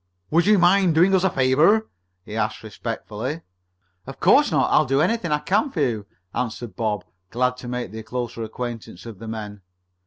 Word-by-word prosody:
"Would 170 +4 +3
you 210 -1 +6
mind 180 -1 +4
doing 180 +4 +5
us 190 -1 +3
a 190 - +4
favor?" 155 +12 +3 0.4
he 105 - -7
asked 110 0 -2
respectfully. 115 +6 -5 0.7
"Of - - -9
course - - +5
not. - - +2
I'll 155 - +5
do 135 +1 +2
anything 200 0 +1
I 150 - +3
can 205 - +1
for 190 - -5
you," 110 -7 -1 0.3
answered 120 -1 -4
Bob, 105 -5 -2 0.2
glad 125 +3 0
to 125 - -9
make 125 -4 -4
the 110 +1 -7
closer 120 +1 -5
acquaintance 115 -3 -6
of 115 -5 -9
the 115 - -8
men. 105 -2 -6
125 Hz, 185 wpm, -23 LUFS, 110-165 Hz, 0.7 s, you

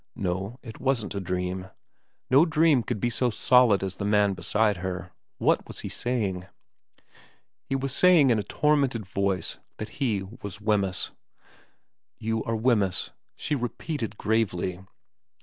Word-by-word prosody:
No, 95 +5 -3
it 115 -4 -9
wasn't 130 -6 0
a 100 - -2
dream. 90 0 -3 0.6
No 135 +4 +7
dream 160 -4 +4
could 115 -1 -3
be 120 +4 0
so 125 +1 +1
solid 120 -3 +4
as 95 -1 -2
the 100 - -6
man 105 -1 +3
beside 105 +4 +1
her. 90 0 -5 0.3
What - - +2
was - - -7
he - - -5
saying? 100 -7 -2 1.2
He 135 - -2
was 135 0 -1
saying 170 -7 +6
in 115 - +3
a - - -2
tormented 140 -3 +1
voice 95 0 -2 0.2
that 110 +7 -8
he 110 -7 +1 0.2
was 100 +1 -7
Wemyss. 105 -3 0 0.5
' - - -45
You 110 -1 0
are 115 - -1
Wemyss,' 110 -5 +1 0.2
she 150 - -3
repeated 120 -3 -3
gravely. 95 -5 0
110 Hz, 150 wpm, -26 LUFS, 95-125 Hz, 1.2 s, No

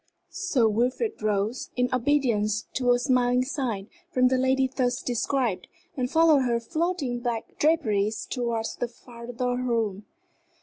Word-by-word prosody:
Sir 360 - +1
Wilfrid 250 - 0
rose, 210 +3 -1
in 250 0 +2
obedience 235 -6 +1
to 250 -1 0
a 245 - +5
smiling 250 0 +2
sign 245 -8 -3 0.2
from 255 -3 +3
the 260 - +2
lady 260 0 +2
thus 250 -1 -1
described, 245 -3 -1 0.3
and 250 -3 -1
followed 320 -2 +5
her 240 -2 +1
floating 310 -2 -2
black 240 -2 -4
draperies 220 -10 +1
towards 235 -3 -2
the 245 - -1
farther 245 +1 -5
room. 225 -5 -1
245 Hz, 135 wpm, -26 LUFS, 230-265 Hz, 0.3 s, a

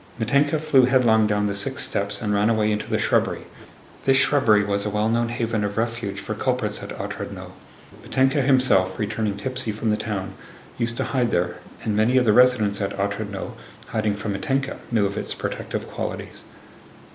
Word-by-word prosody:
Mítenka 140 +7 +2
flew 135 -4 +4
headlong 120 -4 +4
down 105 0 +1
the 100 - 0
six 100 0 -3
steps 100 +2 -3
and 105 -1 0
ran 105 +2 +3
away 110 -2 +2
into 105 0 -2
the - - +1
shrubbery. - - +1 0.6
(This 135 0 +5
shrubbery 115 -7 +4
was 100 0 -1
a 105 - -1
well 105 +1 0
known 115 +1 +1
haven 115 -3 -1
of 100 0 -3
refuge 115 -3 -2
for 110 - -4
culprits 120 -2 -1
at - - -7
Otrádnoe. - - -6 0.5
Mítenka 135 +2 +2
himself, 125 -9 +3
returning 105 -1 -2
tipsy 130 +2 -3
from 110 +1 -1
the 105 - +1
town, 95 -4 -4 0.5
used 115 0 -1
to - - 0
hide 125 -3 0
there, 90 0 0 0.3
and 105 - -1
many 110 +5 +3
of 125 - +4
the 105 - +4
residents 110 -5 +4
at 100 0 -2
Otrádnoe, 100 0 -3 0.4
hiding 110 -2 0
from 105 0 -3
Mítenka, 135 +7 -1
knew 110 -4 +3
of 100 0 -2
its - - -4
protective - - -4
qualities.) - - -6
110 Hz, 180 wpm, -23 LUFS, 105-125 Hz, 0.6 s, This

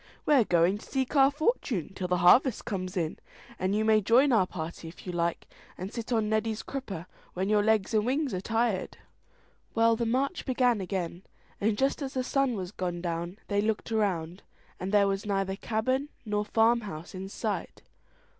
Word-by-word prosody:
"We're 275 -7 +5
going 175 +3 +3
to - - -13
seek 265 +1 -2
our 270 -1 +7
fortune 280 - -1
till 185 -1 -3
the 180 0 +1
harvest 245 +6 +5
comes 185 -2 -3
in; 165 -3 -2 0.4
you 205 +3 +1
may 215 -1 +5
join 250 +7 +4
our 205 -6 +4
party 165 -1 -6
if 165 - -12
you 180 - -3
like, 170 -1 -1 0.3
and 190 +5 -6
sit 235 0 -5
on 220 -3 +2
Neddy's 220 0 -1
crupper 200 -11 -5 0.3
when 190 +2 -1
your 210 -1 +4
legs 220 -1 +2
and 215 -1 +3
wings 270 +2 0
are 185 - -2
tired." 225 -1 -1 0.8
Well, 230 0 +4
the 235 0 -1
march 270 +8 0
began 250 -4 +2
again, 180 -2 -3 0.4
and 210 +1 +1
just 270 +4 +1
as 270 -1 -4
the 255 - 0
sun 270 -1 +1
was 185 -2 -5
gone 180 -3 -3
down 170 +2 -3
they 205 -1 +1
looked 220 +1 -1
around, 185 -5 -1 0.4
and 185 +2 -3
there 205 -1 +5
was 195 0 -1
neither 195 -1 0
cabin 255 +7 -1 0.2
nor 210 -1 -1
farm 230 +2 +3
house 170 -5 -8
in 190 +1 -6
sight. 210 0 -4
210 Hz, 185 wpm, -29 LUFS, 185-235 Hz, 0.8 s, our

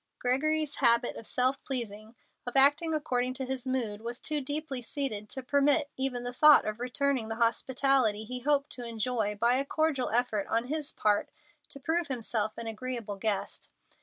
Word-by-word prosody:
Gregory's 300 +4 0
habit 235 -2 +4
of 225 - -9
self 255 +2 +1
pleasing 220 -3 -4 0.3
of 245 - -4
acting 290 +5 +7
according 255 -5 -1
to 265 - -4
his 260 0 -4
mood 230 -5 -2
was 235 +2 -5
too 300 -1 -2
deeply 285 -1 -3
seated 230 -5 -3
to 265 - -6
permit 285 +2 +2
even 260 -2 -1
the 245 0 -5
thought 300 +3 +6
of 215 +1 -4
returning 250 -1 -1
the 225 - -3
hospitality 235 -1 +1
he 250 +3 -6
hoped 285 +2 0
to 245 - -4
enjoy 225 -2 -2
by 240 +3 +3
a 275 - +1
cordial 295 -2 -1
effort 225 -3 0
on 230 +2 -1
his 305 0 -3
part 205 -1 0 0.4
to 275 - -7
prove 325 +4 -1
himself 225 -4 -2
an 230 - -6
agreeable 225 -2 -5
guest. 205 -1 -3
250 Hz, 175 wpm, -29 LUFS, 230-280 Hz, 0.4 s, acting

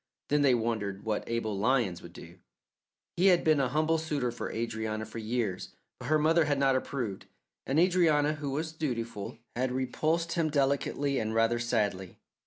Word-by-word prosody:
Then 145 0 +3
they 135 -3 +5
wondered 110 -4 -2
what 110 -1 -1
Abel 115 -3 -1
Lyons 110 -4 +1
would 85 - -12
do. 85 0 -12 0.8
He 185 +3 +4
had 180 -2 +5
been 155 -2 +4
a 130 -2 +1
humble 155 +3 +1
suitor 145 -6 -1
for 120 - -5
Adrianna 110 -1 -3
for 110 +2 -8
years, 110 -4 -3 0.2
but - - -7
her 155 - +4
mother 160 +2 +3
had 145 -1 +1
not 135 -1 +3
approved, 125 -7 -3 0.4
and 135 - 0
Adrianna, 160 -4 +3
who 145 -1 -4
was 155 +4 -2
dutiful, 115 -11 -4 0.2
had 130 +1 0
repulsed 155 +6 -1
him 165 -2 +1
delicately 140 -1 0
and 110 0 -2
rather 115 +1 +2
sadly. 105 -6 -1
130 Hz, 175 wpm, -29 LUFS, 110-150 Hz, 0.8 s, they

